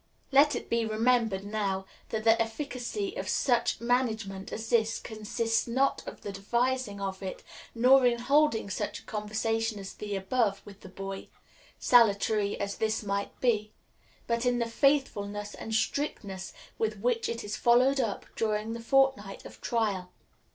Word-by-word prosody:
Let 285 +2 +5
it - - -5
be 235 0 +1
remembered, 220 -2 +1
now, 200 -2 -2 0.2
that 220 -1 -2
the 225 0 +5
efficacy 275 - -3
of - - -4
such 245 -4 +1
management 225 -5 -1
as 220 0 -5
this 225 -1 +3
consists 225 +1 -2
not 265 +4 +1
in - - -6
the 205 - -5
devising 235 +2 -1
of 195 -1 -4
it, 190 -1 -6 0.3
nor 255 +2 +6
in 240 -1 +2
holding 275 -2 +2
such - - -3
a - - -12
conversation 220 +1 -1
as 195 -1 -7
the 205 -1 -5
above 200 +1 0
with 205 0 -13
the 190 - -11
boy 195 +1 -6 0.5
salutary 210 -3 +3
as 200 0 -3
this 220 0 0
might 200 0 -3
be 215 -4 +1 0.5
but 235 0 0
in 245 -1 +2
the 235 - +1
faithfulness 210 -6 0
and 220 - -4
strictness 200 -8 -2 0.3
with 215 -1 0
which 230 +2 0
it 230 0 -3
is 205 +1 -4
followed 255 +3 +4
up 225 -6 -1
during 215 0 -1
the 235 - -5
fortnight 265 -5 +1
of - - -12
trial. 200 -6 -1
225 Hz, 160 wpm, -29 LUFS, 205-245 Hz, 0.5 s, nor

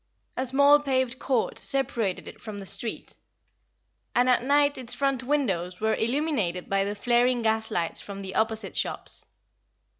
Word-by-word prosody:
A 260 - -1
small 280 +3 +6
paved 260 -3 0
court 255 -4 0
separated 235 -8 -1
it - - -11
from 215 -2 -7
the 200 - -7
street; 225 +4 -6 1.0
and 245 +1 +4
at 250 -2 +4
night 285 +2 +3
its 245 -1 -6
front 275 -1 0
windows 195 -11 -1
were 220 0 +1
illuminated 230 - -1
by 195 0 +1
the 205 +1 -3
flaring 240 +2 +2
gaslights 220 -6 0
from 200 -1 -8
the 190 -1 -6
opposite 220 0 -1
shops. - - -1
240 Hz, 150 wpm, -26 LUFS, 205-265 Hz, 1.0 s, small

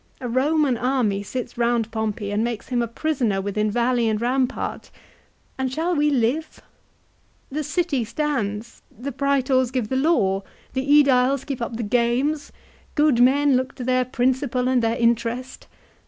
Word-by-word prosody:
"A 250 - -4
Roman 270 +2 +2
army 240 -5 0
sits 240 +4 -6
round 235 -2 +1
Pompey 220 -2 -3
and 210 +2 0
makes 235 0 -4
him 245 -2 +1
a 235 - -1
prisoner 240 -5 -1
within 205 +2 -1
valley 240 +1 +1
and 215 -1 0
rampart; 250 +2 -1 0.7
and 260 -1 -1
shall 330 +6 -1
we 295 0 +3
live? 280 +4 0 0.9
The 305 +2 -2
city 325 -5 0
stands; 230 -4 -3 0.2
the 265 +5 -5
Praetors 265 -1 +1
give 250 -4 -2
the 260 - -1
law, 260 - +2 0.3
the 260 - 0
^Ediles 275 -2 +4
keep 275 -5 -4
up 235 -1 -3
the 235 - -3
games, 245 +7 0 0.4
good 295 -5 +3
men 275 +2 +4
look 260 +1 -1
to 250 - -6
their 255 0 +2
principal 255 0 0
and 255 -1 +2
their 230 +1 0
interest. 235 +2 -1
250 Hz, 155 wpm, -23 LUFS, 230-275 Hz, 0.9 s, ^Ediles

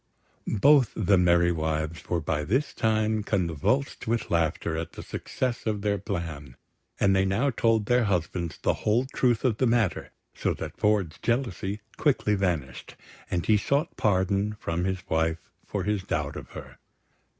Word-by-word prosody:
Both 135 +3 +4
the 100 -2 +3
merry 85 -1 +4
wives 80 0 -3
were 85 -2 0
by 75 0 -1
this 130 - 0
time 110 -1 +1
convulsed 100 - -1
with 115 +1 -1
laughter 85 -1 0
at 80 +1 -4
the - - -8
success 125 -3 -3
of 105 -2 -1
their 100 -1 +1
plan; 80 -9 -5 0.4
and 95 -1 +4
they 95 - +3
now 100 +9 +1
told 115 -2 +2
their 120 +1 +3
husbands 85 -3 -1
the - - +1
whole 115 +5 +2
truth 120 -1 +2
of 115 -4 +2
the 130 - +2
matter, 115 -5 +1 0.2
so - - -1
that - - -7
Ford's 100 -6 +1
jealousy 105 -5 -1 0.2
quickly 135 -8 +2
vanished, 85 -10 -2 0.3
and 85 -1 -1
he 110 - +4
sought 140 +9 0
pardon 100 +1 +1
from 85 +2 -2
his 95 0 -3
wife 80 0 -1
for - - -3
his 105 -2 0
doubt 95 - -2
of - - -8
her. - - -10
100 Hz, 160 wpm, -27 LUFS, 85-110 Hz, 0.4 s, Both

